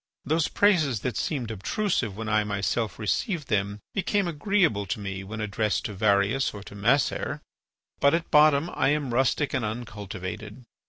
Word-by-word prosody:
Those 160 +1 +2
praises 155 - +2
that 125 - -2
seemed 125 -8 -2
obtrusive 110 - -1
when 110 0 -5
I 110 0 +2
myself 105 +1 -1
received 150 - -1
them 100 0 -1
became 195 0 0
agreeable 170 - +1
to 100 - -2
me 95 -1 -5
when 110 +3 -7
addressed 105 0 -1
to 105 - -3
Varius 100 +5 +2
or 100 - -8
to - - -11
Macer. 115 +8 +1 0.6
But 140 +3 +4
at 170 0 -3
bottom 150 +2 +5
I - - +2
am 145 -4 0
rustic 130 +3 +1
and 130 -3 0
uncultivated. 105 0 -6
115 Hz, 160 wpm, -26 LUFS, 105-150 Hz, 0.6 s, bottom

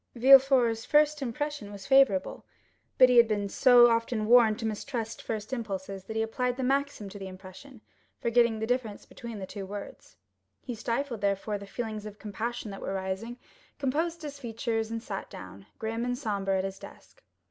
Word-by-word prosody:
Villefort's 255 -2 +5
first 300 0 +3
impression 275 -3 -4
was 200 -1 -9
favorable; 265 -9 +3 0.5
but 255 - +8
he 250 -1 +3
had 235 -1 +8
been 205 -2 -1
so 245 +3 +6
often 230 -1 0
warned 225 -2 +5
to 230 - -5
mistrust 225 +1 -4
first 220 +2 -5
impulses, 195 -5 -5
that 220 - -7
he 220 - +1
applied 250 +2 -2
the 265 - -2
maxim 275 -4 -1
to 205 +1 -9
the 195 - -6
impression, 190 +7 -12 0.4
forgetting 235 -1 +2
the 220 - -2
difference 235 -3 -2
between 235 -2 -9
the 195 - -5
two 200 +1 -7
words. 200 +1 -9 0.5
He 250 - -5
stifled, 235 +1 -3
therefore, 200 +1 -1
the 200 - -10
feelings 215 -1 -5
of 205 -1 -10
compassion 220 +1 -5
that 195 - -8
were 195 - -3
rising, 190 +5 -4 0.4
composed 320 +5 -1
his 285 -2 -7
features, 225 -2 -3
and 230 0 -5
sat 195 -4 -6
down, 95 +1 -11
grim 225 +1 -3
and 245 0 -1
sombre, 200 -6 -1
at 190 - -1
his 195 0 -5
desk. - - -14
225 Hz, 180 wpm, -28 LUFS, 205-250 Hz, 0.5 s, but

